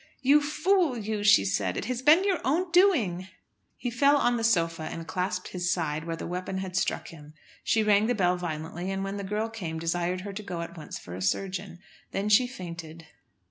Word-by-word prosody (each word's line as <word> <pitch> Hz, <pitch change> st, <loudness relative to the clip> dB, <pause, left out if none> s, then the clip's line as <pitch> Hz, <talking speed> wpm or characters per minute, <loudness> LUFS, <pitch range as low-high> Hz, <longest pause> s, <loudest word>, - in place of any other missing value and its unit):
"You 285 Hz, +3 st, +6 dB
fool, 320 Hz, -1 st, +1 dB
you," 215 Hz, -1 st, -3 dB
she 200 Hz, -, +6 dB
said; 95 Hz, -1 st, -1 dB
"it -, -, -3 dB
has 250 Hz, +1 st, -3 dB
been 305 Hz, +7 st, +6 dB
your 385 Hz, -5 st, +1 dB
own 345 Hz, +6 st, 0 dB
doing." 255 Hz, -, +3 dB, 0.5 s
He 245 Hz, -, -3 dB
fell 280 Hz, +4 st, +4 dB
on 245 Hz, -3 st, +2 dB
the 230 Hz, -, -2 dB
sofa, 165 Hz, -7 st, +2 dB
and 165 Hz, -, -6 dB
clasped 185 Hz, +1 st, -3 dB
his 180 Hz, -1 st, -1 dB
side, 155 Hz, -2 st, -1 dB
where 165 Hz, -1 st, -3 dB
the -, -, -7 dB
weapon 180 Hz, +2 st, -4 dB
had 190 Hz, -1 st, -5 dB
struck 190 Hz, -, -1 dB
him. 150 Hz, -2 st, -13 dB, 0.3 s
She 220 Hz, -, +2 dB
rang 210 Hz, 0 st, +4 dB
the 245 Hz, -, +1 dB
bell 180 Hz, -3 st, +2 dB
violently, 175 Hz, +1 st, -5 dB
and, 195 Hz, 0 st, -2 dB
when 195 Hz, +1 st, -4 dB
the 200 Hz, -, -4 dB
girl 210 Hz, +3 st, -2 dB
came, 185 Hz, -8 st, -5 dB
desired 175 Hz, +2 st, -1 dB
her 200 Hz, +1 st, -6 dB
to 205 Hz, -, -5 dB
go 180 Hz, -4 st, -5 dB
at 170 Hz, +1 st, -7 dB
once 155 Hz, -3 st, -7 dB
for 85 Hz, -, -10 dB
a 95 Hz, -, -6 dB
surgeon. 185 Hz, -, -2 dB, 0.4 s
Then 200 Hz, +2 st, -1 dB
she 230 Hz, +4 st, +5 dB
fainted. 170 Hz, -7 st, -8 dB
190 Hz, 215 wpm, -27 LUFS, 170-230 Hz, 0.5 s, You